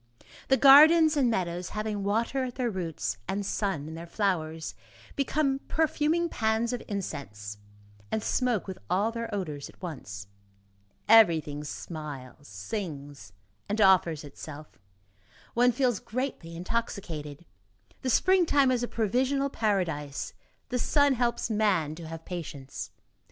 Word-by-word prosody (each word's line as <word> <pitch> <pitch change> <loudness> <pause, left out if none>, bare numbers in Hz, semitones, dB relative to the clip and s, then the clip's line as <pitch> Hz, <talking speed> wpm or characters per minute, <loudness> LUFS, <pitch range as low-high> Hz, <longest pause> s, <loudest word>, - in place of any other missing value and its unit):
The 265 - +4
gardens 310 +4 +8
and 270 -4 +3
meadows, 180 -4 -2
having 215 -1 -3
water 230 +6 0
at 245 - -6
their 245 -3 -1
roots, 165 - -3
and 200 +1 -2
sun 190 -8 -2
in 160 - -7
their 165 +1 -8
flowers, 165 -5 -1 0.4
become 275 -1 +1
perfuming 315 +2 +1
pans 225 -3 0
of 245 - -3
incense, 105 - -5 0.5
and 220 - -1
smoke 245 -6 +1
with 190 -2 -7
all 205 +5 +2
their 230 0 -5
odors 155 -9 -4
at - - -18
once. 120 - -7 0.8
Everything 165 -9 +5
smiles, 145 -4 -7
sings 140 - -6 0.4
and 210 +2 -1
offers 185 -6 +4
itself. 150 +1 -10 0.7
One 245 +1 +4
feels 245 -4 +1
gently 230 -9 -4
intoxicated. 170 -6 -4 0.6
The 260 - -1
springtime 300 -3 +4
is 250 -2 +1
a 245 - -1
provisional 260 +6 0
paradise, 165 - -1 0.4
the 250 - -1
sun 285 +2 +3
helps 240 -1 0
man 195 -8 +2
to 165 0 -9
have 165 0 -8
patience. 150 -6 -6
200 Hz, 130 wpm, -28 LUFS, 155-245 Hz, 0.8 s, gardens